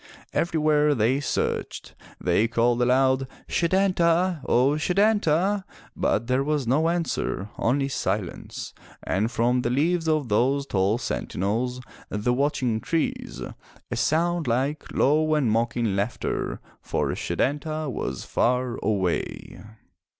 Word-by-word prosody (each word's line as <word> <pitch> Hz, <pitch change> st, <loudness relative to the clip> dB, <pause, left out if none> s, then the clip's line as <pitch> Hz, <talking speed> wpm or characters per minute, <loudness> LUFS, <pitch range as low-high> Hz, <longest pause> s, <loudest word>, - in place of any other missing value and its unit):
Everywhere 150 Hz, -3 st, +2 dB
they 120 Hz, +4 st, +2 dB
searched. 145 Hz, -, -2 dB, 0.3 s
They 90 Hz, +5 st, +2 dB
called 120 Hz, +1 st, +1 dB
aloud, 130 Hz, +1 st, +3 dB, 0.2 s
"Setanta! 175 Hz, -2 st, +2 dB
O 130 Hz, +3 st, +4 dB
Setanta!" 190 Hz, +2 st, +2 dB, 0.3 s
But 110 Hz, -, 0 dB
there 130 Hz, +2 st, +1 dB
was 150 Hz, -2 st, 0 dB
no 150 Hz, +7 st, +2 dB
answer, 165 Hz, -, -2 dB
only 135 Hz, +4 st, +1 dB
silence, 140 Hz, -, -3 dB, 0.3 s
and 105 Hz, +5 st, 0 dB
from 120 Hz, +2 st, +1 dB
the 120 Hz, -, -1 dB
leaves 165 Hz, +6 st, +1 dB
of 155 Hz, -4 st, +1 dB
those 130 Hz, +6 st, +2 dB
tall 100 Hz, -3 st, +1 dB
sentinels, 120 Hz, +2 st, -2 dB, 0.3 s
the 105 Hz, +4 st, 0 dB
watching 125 Hz, -4 st, 0 dB
trees, 165 Hz, +6 st, -2 dB, 0.5 s
a -, -, -1 dB
sound 170 Hz, 0 st, +1 dB
like 135 Hz, +6 st, -1 dB
low 155 Hz, +3 st, +3 dB
and 135 Hz, -7 st, +2 dB
mocking 115 Hz, -2 st, 0 dB
laughter 100 Hz, +4 st, -2 dB
— -, -, -31 dB
for -, -, -1 dB
Setanta 155 Hz, +2 st, -2 dB
was 65 Hz, -, -4 dB
far 125 Hz, 0 st, 0 dB
away! 100 Hz, -4 st, -2 dB
135 Hz, 120 wpm, -25 LUFS, 115-155 Hz, 0.5 s, O